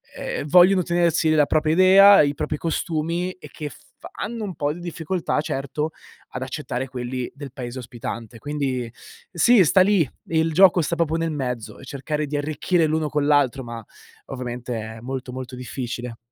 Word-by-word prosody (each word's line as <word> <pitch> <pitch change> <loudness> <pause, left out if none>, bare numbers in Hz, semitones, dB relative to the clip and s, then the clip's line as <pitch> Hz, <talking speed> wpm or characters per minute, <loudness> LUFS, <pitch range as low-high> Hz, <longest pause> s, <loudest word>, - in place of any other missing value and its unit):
ehm, - - -4
vogliono 180 +3 +6
tenersi 170 -2 +2
la 150 -2 +4
propria 155 0 +1
idea, 195 +3 +8
i 145 -1 +1
propri 150 - -3
costumi 170 +2 -2
e - - -13
che 150 -2 -6
f - - -14 0.4
hanno 225 +1 -4
un 190 -3 -4
po' 145 -1 -1
di 170 - -7
difficoltà 170 -2 -2
certo, 150 +2 -3 0.4
ad 125 - -5
accettare 130 -1 -4
quelli 125 0 -5
del 140 -1 -9
paese 125 0 -6
ospitante. 115 -1 -7
Quindi 130 -3 -3 0.4
sì, 195 +3 +5
sta 185 +5 +5
lì, 190 -7 +3 0.2
il 160 0 +1
gioco 185 0 +6
sta 170 +2 -1
proprio 165 -1 0
nel 165 -1 -1
mezzo 125 -6 -4
e 130 - -12
cercare 150 +3 -3
di 145 +1 -2
arricchire 155 +3 0
l'uno 155 -1 0
con 150 -1 0
l'altro, 140 -3 +2
ma 115 -2 -7 0.4
ovviamente 125 -1 -5
è 110 +1 -7
molto, 130 +1 -5
molto 130 0 -7
difficile. 125 -1 -6
150 Hz, 175 wpm, -23 LUFS, 130-170 Hz, 0.4 s, idea